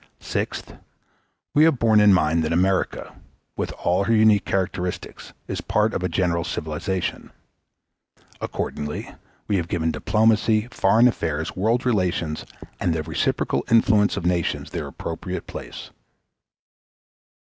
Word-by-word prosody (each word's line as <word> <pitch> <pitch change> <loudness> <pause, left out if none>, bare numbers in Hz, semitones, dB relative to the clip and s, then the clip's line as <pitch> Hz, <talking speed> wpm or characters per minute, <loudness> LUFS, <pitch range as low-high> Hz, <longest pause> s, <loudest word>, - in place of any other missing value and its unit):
Sixth. - - -4 0.8
We 150 - +5
have 160 -5 +3
borne 110 -2 +4
in 105 -1 +6
mind 80 -3 +3
that 80 - -1
America, 95 +3 0 0.4
with - - -2
all 90 +3 0
her 115 - +2
unique 110 -2 +4
characteristics, 90 -2 -3 0.2
is - - -3
a - - -8
part 105 +1 +1
of - - -2
a 90 - -1
general 85 -3 0
civilization. 85 +3 -3 1.1
Accordingly 75 0 -4 0.3
we 100 - +1
have 85 -2 -2
given 80 -2 0
diplomacy, 110 +4 +2
foreign 115 +2 +4
affairs, 80 -8 -2
world 115 +6 +1
relations, 90 -9 0 0.3
and 85 -2 0
the 80 - -2
reciprocal 80 -1 -1
influences 110 -2 +4
of - - -3
nations 85 -2 -1
their - - -4
appropriate - - -5
place. - - -8
95 Hz, 130 wpm, -23 LUFS, 85-110 Hz, 1.1 s, in